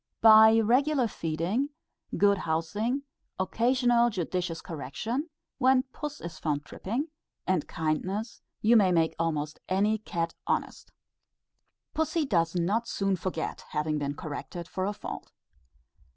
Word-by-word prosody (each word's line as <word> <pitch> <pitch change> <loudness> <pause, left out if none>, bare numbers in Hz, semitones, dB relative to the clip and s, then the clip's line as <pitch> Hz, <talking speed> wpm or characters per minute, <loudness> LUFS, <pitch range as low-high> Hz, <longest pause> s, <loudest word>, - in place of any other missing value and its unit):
By 220 0 +8
regular 255 +4 +3
feeding, 175 - -1 0.5
good 200 -1 +4
housing, 205 - -1 0.3
occasional 240 +4 +3
judicious 180 -4 -2
correction 220 - -4 0.3
when 260 0 +4
puss 300 0 -5
is 170 -2 -8
found 150 -2 -1
tripping 255 - -3 0.4
and 185 -5 0
kindness, 185 +8 -2 0.2
you 225 +3 +6
may 195 -5 +5
make 165 -2 +2
almost 155 -2 -1
any 205 +4 +2
cat 170 -5 -3
honest. - - -2 1.0
Pussy 320 0 0
does 170 -8 +1
not 200 +7 +1
soon 195 -3 0
forget 175 -2 -3
having 150 0 0
been 145 0 -2
corrected 155 +2 -6
for 185 0 -2
a 205 - -1
fault. - - -7
190 Hz, 125 wpm, -28 LUFS, 165-235 Hz, 1.0 s, By